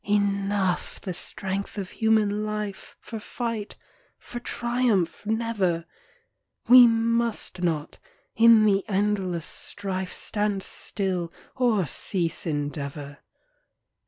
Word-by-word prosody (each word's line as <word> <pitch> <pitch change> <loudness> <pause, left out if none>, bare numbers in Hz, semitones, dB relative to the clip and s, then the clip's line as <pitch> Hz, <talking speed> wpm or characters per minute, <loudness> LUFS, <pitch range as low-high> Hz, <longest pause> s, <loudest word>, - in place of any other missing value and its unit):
Enough 200 -2 0
the 185 - -4
strength 195 +3 -4
of 195 -2 -4
human 215 -2 +2
life, 210 -2 -5
For 225 - -7
fight 230 -1 -4 0.4
â - - -26
^for - - -26
triumph, 235 -9 0
never! 210 -7 0 0.8
We 250 0 +10
must 230 -4 0
not, 160 -4 -2 0.4
in 230 -1 +7
the 200 -2 +3
endless 195 -4 0
strife, 190 -2 -4
Stand 205 -2 -1
still, 185 -4 -1 0.2
or 230 -7 +2
cease 165 +7 -2
endeavour. 145 -1 -4
200 Hz, 100 wpm, -26 LUFS, 180-220 Hz, 0.8 s, We